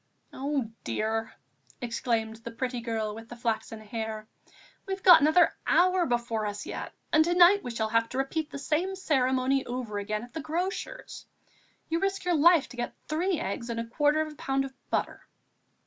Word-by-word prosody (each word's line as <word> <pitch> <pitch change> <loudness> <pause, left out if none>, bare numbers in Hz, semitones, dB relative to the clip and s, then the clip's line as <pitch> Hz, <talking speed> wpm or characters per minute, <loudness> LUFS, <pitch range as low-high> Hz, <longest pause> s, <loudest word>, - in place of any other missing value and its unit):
"Oh, 270 -4 -2
dear!" 220 - -2 0.4
exclaimed 230 -2 -1
the 230 +1 -8
pretty 245 +1 -3
girl 220 -2 -2
with 225 +1 -10
the 240 - -8
flaxen 225 -2 -3
hair, 220 0 -5 0.6
"we've 385 0 -4
got 350 -4 +9
another 315 +4 +5
hour 365 0 +4
before 235 -3 -1
us 205 0 -5
yet, - - -5 0.2
and 315 - +6
to 345 +2 0
night 360 +3 +7
we - - -4
shall 220 -2 -2
have 230 +1 +2
to 255 - -5
repeat 295 +3 -1
the - - -7
same 325 +7 -1
ceremony 265 -5 +1
over 240 -4 -3
again 210 +2 -3
at 245 - -12
the 320 - -4
grocer's. 345 +5 -4 0.6
You 330 +1 0
risk 390 0 -1
your 355 - +2
life 330 0 +5
to 245 - -12
get 240 - -3
three 340 +3 0
eggs 200 +5 -4
and 230 0 -2
a 230 - -2
quarter 295 +6 +2
of 310 -1 -4
a - - -20
pound 270 0 0
of 270 - -9 0.2
butter." - - -2
255 Hz, 185 wpm, -28 LUFS, 230-315 Hz, 0.6 s, got